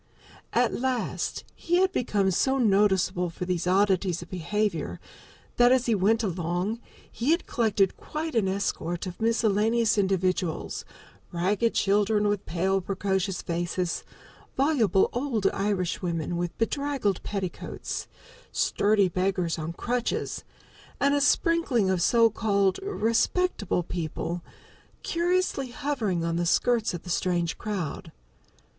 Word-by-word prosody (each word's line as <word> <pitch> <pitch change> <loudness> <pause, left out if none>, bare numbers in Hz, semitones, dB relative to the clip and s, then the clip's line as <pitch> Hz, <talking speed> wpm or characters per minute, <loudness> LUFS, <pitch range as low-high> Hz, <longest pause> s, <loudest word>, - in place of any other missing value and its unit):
At - - +2
last 255 -1 -2
he 345 - -1
had 375 +1 +3
become 205 - +1
so 265 +9 +2
noticeable 195 -5 +2
for 175 +2 -5
these 180 -1 -1
oddities 190 -2 +2
of - - -17
behavior 180 - -2 0.6
that, 245 0 +6
as 255 -1 +3
he 235 - +2
went 215 +3 +2
along, 180 +3 -2 0.3
he 240 +5 -2
had 335 +3 +2
collected 210 -5 +1
quite 315 +1 -5
an 220 -4 +2
escort 190 -3 -2
of 180 +1 -7
miscellaneous 225 0 +2
individuals, 185 -3 -1 0.5
ragged 200 +6 0
children 205 +1 +2
with 205 -1 -1
pale, 190 +3 0
precocious 190 0 -1
faces, 175 +1 -2 0.5
voluble 260 -9 +3
old 245 -5 -1
Irishwomen 180 -4 -1
with 175 0 -3
bedraggled 265 -5 -1
petticoats, 195 -4 -4 0.4
sturdy 205 -1 +2
beggars 180 -2 -1
on 160 +1 -3
crutches, 240 +7 -2 0.6
and 280 0 +3
a 285 - +2
sprinkling 290 - +2
of 185 -2 0
so 230 +3 +4
called 200 -3 +1
"respectable" 235 - 0
people, 170 +1 -4 0.6
curiously 350 -5 0
hovering 240 - -2
on 165 0 -1
the 175 0 0
skirts 230 +1 +2
of 175 - -8
the 180 - -6
strange 175 -1 0
crowd. 195 -8 -4
200 Hz, 125 wpm, -27 LUFS, 180-235 Hz, 0.6 s, that